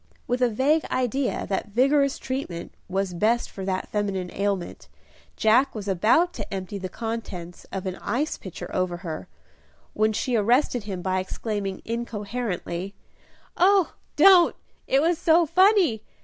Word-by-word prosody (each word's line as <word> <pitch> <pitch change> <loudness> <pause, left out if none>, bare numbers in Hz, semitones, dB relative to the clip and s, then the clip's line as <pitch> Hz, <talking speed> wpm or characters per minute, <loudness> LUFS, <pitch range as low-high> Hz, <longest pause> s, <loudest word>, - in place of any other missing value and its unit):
With 245 +1 -1
a 250 - +4
vague 280 +8 +2
idea 255 +1 -1
that 195 +2 -2
vigorous 275 +6 +2
treatment 260 -11 -5 0.2
was 190 0 -1
best 220 +7 +1
for 195 - -7
that 190 -1 -2
feminine 195 -4 -2
ailment, 200 -3 -2 0.5
Jack 235 +5 +3
was 205 -2 -5
about 220 - +3
to 205 - -7
empty 195 +1 -4
the 185 -1 -5
contents 200 -6 -6
of 190 0 -4
an 185 0 -3
ice 260 +10 -1
pitcher 190 - -8
over 185 -1 -1
her, 160 -2 -5 0.7
when 215 0 +2
she 240 +3 -1
arrested 240 +1 +2
him, 190 -4 -5
by 185 0 0
exclaiming, 195 +1 -4
incoherently, 210 -5 -4 0.6
"Oh, 380 -1 +4 0.2
don't! 370 -3 +7 0.3
it 275 +2 +3
was 335 0 +2
so 335 0 +4
funny! 365 - +4
215 Hz, 145 wpm, -25 LUFS, 190-265 Hz, 0.7 s, don't